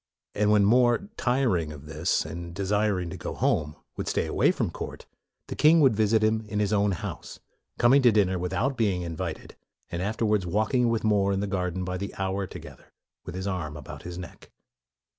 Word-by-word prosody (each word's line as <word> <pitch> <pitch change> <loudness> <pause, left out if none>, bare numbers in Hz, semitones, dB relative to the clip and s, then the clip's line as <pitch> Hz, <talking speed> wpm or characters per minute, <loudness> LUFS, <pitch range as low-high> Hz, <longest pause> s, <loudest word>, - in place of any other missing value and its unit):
'' - - -65
And 105 0 +1
when 105 -1 +5
More, 120 - +3
tiring 120 - +1
of 75 -1 -10
this 80 +2 -1
and 85 0 -7
desiring 100 -2 0
to - - -6
go - - -5
home, 75 0 0 0.2
would - - -5
stay - - 0
away - - +2
from - - -1
court, - - -7 0.4
the - - -6
king 160 +2 +5
would 135 -7 +5
visit 110 +1 +2
him 110 0 +2
in 105 - -4
his 105 0 +1
own 100 -1 +2
house, 85 - -7 0.4
coming 130 +4 +5
to 125 -2 +6
dinner 95 -4 +2
without 95 +10 -1
being 100 -6 +1
invited, 85 -2 -5 0.4
and 85 - -3
afterwards 105 -1 0
walking 110 +6 +1
with 115 -1 0
More 100 -2 +2
in 95 - 0
the 100 - -1
garden 95 -2 -2
by 90 0 -3
the 100 +2 -6
hour 95 0 -2
together - - -12 0.3
with - - -7
his 95 +1 -4
arm 85 -6 -3
about 70 - -9
his 85 0 -7
neck. 90 - -10
100 Hz, 200 wpm, -27 LUFS, 90-110 Hz, 0.4 s, to